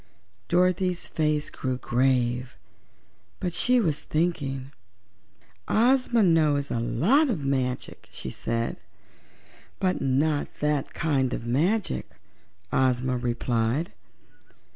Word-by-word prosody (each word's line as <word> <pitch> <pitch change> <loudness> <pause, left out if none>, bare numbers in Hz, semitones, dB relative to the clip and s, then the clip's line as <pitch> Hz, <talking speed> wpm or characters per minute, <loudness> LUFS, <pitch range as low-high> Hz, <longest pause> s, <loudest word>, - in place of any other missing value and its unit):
Dorothy's 180 0 +1
face 150 -2 0
grew 130 -1 -3
grave; 125 -1 0 0.8
but 180 -2 -2
she 250 +5 +3
was 160 -9 0
thinking. 140 -5 -2 1.0
"Ozma 245 0 +3
knows 155 -5 +3
a 115 - 0
lot 220 - +3
of 165 - -2
magic," 130 -2 -2
she - - -6
said. 115 0 -2 1.0
"But 185 -1 0
not 145 +3 0
that 150 -2 -1
kind 135 -5 +1
of - - -6
magic," 170 - 0 0.6
Ozma 130 -1 +2
replied. 120 - -1
145 Hz, 100 wpm, -26 LUFS, 125-175 Hz, 1.0 s, she